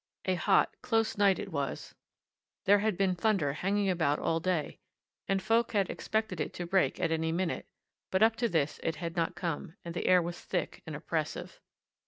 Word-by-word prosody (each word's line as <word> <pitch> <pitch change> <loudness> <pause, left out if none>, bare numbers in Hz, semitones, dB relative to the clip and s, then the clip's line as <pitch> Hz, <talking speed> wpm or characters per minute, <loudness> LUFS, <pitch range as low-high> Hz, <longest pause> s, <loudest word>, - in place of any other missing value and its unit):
A 185 - +2
hot, 190 +2 +3
close 225 -3 +1
night 200 -2 +4
it - - -6
was 140 -4 -3 0.7
there 205 +1 +6
had 210 -3 0
been 190 -1 +2
thunder 180 -7 +1
hanging 195 +5 0
about 160 -6 +2
all 165 - 0
day, 170 -3 -1 0.5
and 195 0 +2
folk 230 +2 +2
had 200 -3 +2
expected 220 -6 -2
it - - -4
to 175 - -4
break 190 +1 +2
at 170 -3 +1
any 160 0 0
minute, 170 +1 -2 0.4
but 190 +3 +3
up 225 0 +5
to 235 -1 +1
this 155 -5 0
it 165 - -1
had 170 0 -5
not 170 0 0
come, 170 0 -4
and 170 - -5
the 170 - -2
air 185 0 +7
was 175 0 -4
thick - - -3
and - - -5
oppressive. - - -3
185 Hz, 195 wpm, -31 LUFS, 165-205 Hz, 0.7 s, air